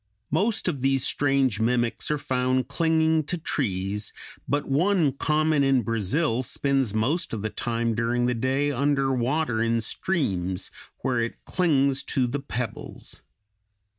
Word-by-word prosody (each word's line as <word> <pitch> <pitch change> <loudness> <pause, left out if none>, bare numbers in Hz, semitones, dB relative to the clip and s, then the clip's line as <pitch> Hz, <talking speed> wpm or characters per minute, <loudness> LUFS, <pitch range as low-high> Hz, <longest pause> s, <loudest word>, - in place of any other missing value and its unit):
Most 200 - +1
of 145 -7 -1
these 135 0 +2
strange 135 -6 +2
mimics 120 +1 0
are 150 - +1
found 130 -1 0
clinging 160 -1 +2
to 175 - -2
trees; 105 - -2 0.4
but 145 0 0
one 165 +2 +2
common 155 +1 +1
in 135 -3 +3
Brazil 115 - 0
spends 135 -1 +1
most 130 +6 0
of 105 - -5
the 110 - -2
time 115 -1 -1
during 120 +2 0
the 125 - +1
day 130 +5 0
under 135 0 +1
water 125 -1 0
in 115 0 +1
streams, 95 - -1 0.3
where 125 -2 0
it 115 0 -4
clings 140 -6 +2
to 130 -2 0
the 130 +4 -2
pebbles. 125 -5 -6
130 Hz, 140 wpm, -25 LUFS, 115-145 Hz, 0.4 s, in